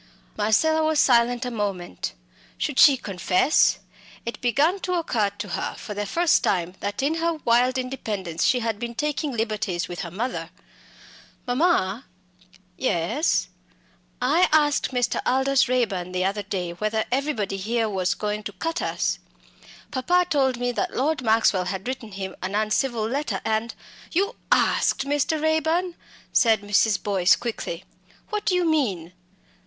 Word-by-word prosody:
Marcella 315 +10 +2
was 310 -1 +2
silent 240 0 +3
a 250 - -3
moment. 195 - -3 0.4
Should - - -1
she 275 -2 +8
confess? 190 - +2 0.5
It 235 - -5
began 290 - +2
to 365 -1 -2
occur 235 - 0
to 205 - -5
her - - -3
for 210 - -7
the 205 0 -3
first 340 - +2
time 180 -2 0
that 205 +5 -3
in 310 +4 +1
her 335 0 +1
wild 245 +2 +3
independence 210 -10 -3
she 250 -2 +3
had 225 -2 -2
been 235 0 -5
taking 295 +2 -1
liberties 215 -6 -2
with 175 - -7
her 175 - -4
mother. 225 +9 -4 1.0
"Mamma!" 250 - +1 0.7
"Yes." 230 - 0 0.7
"I 300 +9 +3
asked 295 -2 +3
Mr. 245 -2 0
Aldous 265 +1 +2
Raeburn 195 -8 0
the 185 0 0
other 200 +2 -1
day 185 -3 -3
whether 215 +5 -1
everybody 250 -8 -1
here 225 +3 0
was 190 -3 0
going 210 0 -3
to 205 - -5
cut 325 - -3
us! - - -1 0.7
Papa 355 +7 +2
told 265 -4 +2
me 245 0 -1
that 365 +9 -2
Lord 295 +2 +1
Maxwell 220 -5 +3
had 190 +3 -4
written 250 -5 -5
him 190 -1 -5
an 190 +2 -3
uncivil 215 +2 0
letter 280 +6 -2
and 220 +2 -1 0.2
" - - -20
"You 400 +7 +1 0.2
asked - - +2
Mr. 290 +2 0
Raeburn 320 +3 +1 0.2
" - - -26
said 225 -4 +3
Mrs. 205 +1 +2
Boyce, 195 -3 +4
quickly. 190 -7 -5 0.5
"What 425 -1 -3
do 365 - +2
you 360 -1 +2
mean?" 205 - 0
235 Hz, 155 wpm, -24 LUFS, 200-285 Hz, 1.0 s, she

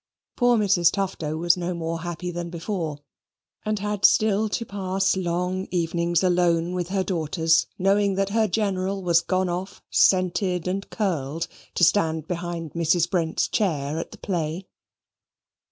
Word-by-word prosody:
Poor 245 -1 +3
Mrs. 195 -5 +3
Tufto 180 -6 -2
was 170 +1 +3
no 180 0 -3
more 165 0 -3
happy 175 +1 -4
than 175 0 -5
before, 170 -3 -4 0.7
and 215 0 -1
had 205 0 -3
still 215 0 +4
to 230 - -2
pass 195 -1 0
long 180 +1 -2
evenings 170 0 0
alone 175 -1 +2
with 180 -1 -3
her 190 0 0
daughters, 165 -2 +1
knowing 195 +1 +2
that 195 0 0
her 220 +1 +2
General 195 -1 -1
was 170 -1 +4
gone 185 +1 0
off 180 +2 -5
scented 185 -1 +2
and 195 +2 -3
curled 165 - -2 0.3
to - - +1
stand 160 -4 +2
behind 170 -2 -4
Mrs. 170 0 +2
Brent's 165 -4 0
chair 155 -6 -1
at - - -5
the - - -12
play. 170 -1 -3
180 Hz, 150 wpm, -24 LUFS, 170-195 Hz, 0.7 s, still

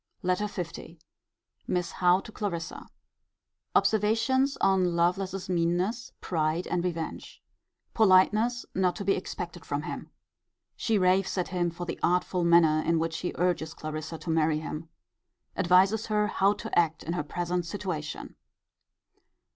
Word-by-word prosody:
LETTER 185 +3 +1 0.3
L. - - -9 0.8
Miss 180 -1 -1
Howe 180 +1 +3
to 220 - -11
Clarissa. 180 -6 -4 0.9
Observations 230 +6 +2
on 185 -3 +2
Lovelace's 185 +2 0
meanness, 180 +7 0
pride, 160 0 -1
and 175 - -1
revenge. 170 -3 -5 0.5
Politeness 220 +4 +4
not 185 -2 +1
to 200 - -5
be 195 - +4
expected - - -5
from - - -3
him. - - -6 0.7
She 225 -2 0
raves 185 +1 +2
at 180 - -1
him 175 -2 0
for 170 +1 -6
the - - -5
artful 180 +1 +1
manner 165 -2 +5
in 165 0 +2
which 165 0 -1
he 180 - -3
urges 165 -3 -1
Clarissa 155 +1 -5
to 165 - -4
marry 160 -1 +2
him. 155 +1 -6 0.7
Advises 190 +5 +3
her 210 -1 +2
how 200 -1 +2
to 225 +2 -6
act 165 -2 0
in 170 - -3
her 175 - -1
present 175 +3 -2
situation. 165 -6 -5
180 Hz, 140 wpm, -28 LUFS, 170-195 Hz, 0.9 s, manner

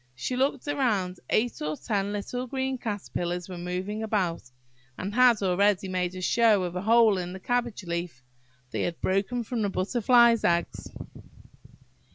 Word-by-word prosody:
She 190 - -3
looked 270 +1 0
round–eight 230 -5 -1
or 150 0 -2
ten 200 -2 -2
little 245 +5 -4
green 265 0 -2
caterpillars 180 -5 -3
were 180 -2 -7
moving 185 +5 -4
about, 190 - -1 0.5
and 195 +2 -4
had 245 -3 +5
already 195 +1 +2
made 180 -1 -2
a 185 - -6
show 215 0 +3
of 175 0 -4
a 180 - -2
hole 220 -1 +4
in 180 0 -5
the 190 - -7
cabbage 240 -1 -2
leaf. 170 -6 -4 0.5
They - - -2
had 170 -1 -2
broken 200 +6 0
from 230 0 -3
the 205 - +1
Butterfly's 235 +4 +3
eggs! 170 0 0
200 Hz, 155 wpm, -27 LUFS, 180-235 Hz, 0.5 s, had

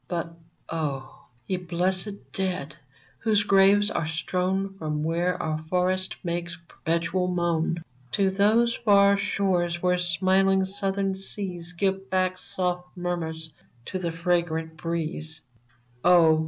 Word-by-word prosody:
But, 170 -1 -3 0.3
oh! 145 -5 -4 0.2
ye 185 - -1
blessed 185 +3 -1
dead, 180 -6 -2 0.4
whose 215 -2 +2
graves 200 +1 +5
are 155 - -1
strown 185 +4 -1
From 150 -1 -2
where 170 +3 0
our 155 0 -1
forests 185 +1 0
make 175 0 -2 0.2
perpetual 170 +3 -1
moan, 170 -2 0 0.3
To 195 -2 +3
those 220 +5 +3
far 200 -3 +5
shores 185 -4 0
where 180 0 +3
smiling 190 +2 +3
Southern 195 0 -1
seas 190 -3 -4
Give 195 +1 -1
back 185 -1 +1
soft 180 -1 -3
murmurs 160 -3 -3 0.3
to 185 - -4
the 170 -2 -2
fragrant 165 -1 -1
breeze 160 -1 -4 0.3
— 120 0 -35
Oh 170 -3 +6
180 Hz, 125 wpm, -26 LUFS, 165-190 Hz, 0.4 s, Oh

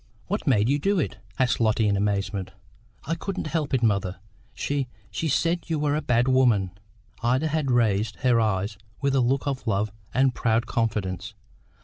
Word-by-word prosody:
"What - - -3
made 105 +1 +4
you 140 +3 +2
do 200 +6 +1
it?" 150 - -2 0.2
asked 125 -1 +2
Lotty 110 -1 +2
in 100 - +2
amazement. 100 -1 -1 0.5
"I 165 - -1
couldn't 190 +3 -4
help 155 -2 -1
it, 130 -3 +1
mother; 100 -4 +1 0.3
she 140 +1 -2 0.2
she 165 - -2
said 170 +4 0
you 160 - +1
were 145 -1 +1
a 155 - 0
bad 120 -2 +2
woman." 120 -8 +3 0.5
Ida 130 +6 +1
had 155 -3 0
raised 110 -3 +2
her 125 -3 +4
eyes 100 -1 -1 0.2
with 140 -1 +1
a 135 - +3
look 130 +2 +1
of 135 -3 -3
love 105 0 +1 0.2
and 130 0 +3
proud 115 -1 +1
confidence. 105 -3 -2
120 Hz, 175 wpm, -25 LUFS, 105-140 Hz, 0.5 s, made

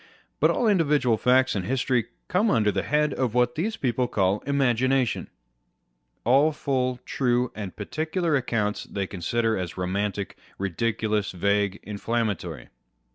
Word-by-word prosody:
But - - +4
all 235 - +1
individual 150 - +3
facts 130 +4 +3
and 95 - -2
history 125 +2 0 0.2
come 205 +5 +2
under 105 - +3
the - - -1
head 150 0 +1
of 125 -3 -1
what 125 0 +3
these 215 - -2
people 125 -1 0
call 100 -3 +1
Imagination. 130 -2 +1 0.9
All 135 +6 +4
full, 130 -4 -1
true, 125 -1 0
and 100 -4 -6
particular 155 - -1
accounts 115 -6 -1
they 100 -1 -3
consider 110 +5 -1
as 90 -1 -4
romantic, 100 +2 -2 0.2
ridiculous, 105 +2 -1
vague, 100 +2 0
inflammatory. 105 - -3
120 Hz, 130 wpm, -25 LUFS, 100-135 Hz, 0.9 s, But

